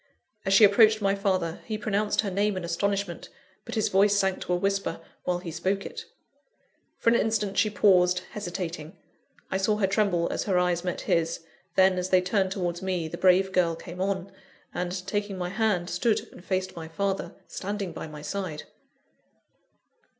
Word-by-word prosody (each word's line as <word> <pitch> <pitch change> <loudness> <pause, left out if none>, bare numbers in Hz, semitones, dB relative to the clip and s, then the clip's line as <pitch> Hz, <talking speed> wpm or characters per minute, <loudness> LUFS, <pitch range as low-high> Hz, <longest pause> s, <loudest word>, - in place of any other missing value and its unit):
As 195 - +3
she 220 - +7
approached 215 +2 +6
my 195 -1 +2
father, 185 -4 -1
he 215 - -3
pronounced 210 0 0
her 205 -3 -3
name 200 +1 +1
in 185 - -4
astonishment; 195 +1 -2 0.4
but - - -6
his 220 - +1
voice 200 +2 +4
sank 190 -1 +1
to - - -4
a - - +4
whisper, 195 -2 -1 0.3
while 180 -1 +1
he 175 -1 -7
spoke 190 +5 -1
it. - - -7 0.9
For 230 - +3
an - - +4
instant, 215 -3 0
she 215 - +3
paused, 180 -3 +4
hesitating 175 -4 -5 0.5
I 190 - +1
saw 210 +2 +1
her 205 - +2
tremble 195 -3 +1
as - - -2
her 190 -3 +1
eyes 180 -1 +1
met 180 -1 -3
his 165 0 0 0.3
then, 190 -1 +4
as 180 +1 -2
they 185 - +5
turned 190 +1 0
towards 175 -3 -2
me, 185 -4 -1
the 170 - -6
brave 190 +1 +4
girl 175 -3 +2
came 175 +2 -8
on; 195 -1 -1 0.4
and, 180 +1 -3
taking 205 0 -2
my 180 -1 -3
hand, 195 -3 0
stood 210 +6 0
and - - -14
faced 185 0 -2
my 165 -1 -7
father, 195 +4 -2
standing 200 -1 -4
by - - -6
my 150 -1 -10
side. 170 -1 -4
190 Hz, 180 wpm, -27 LUFS, 180-200 Hz, 0.9 s, she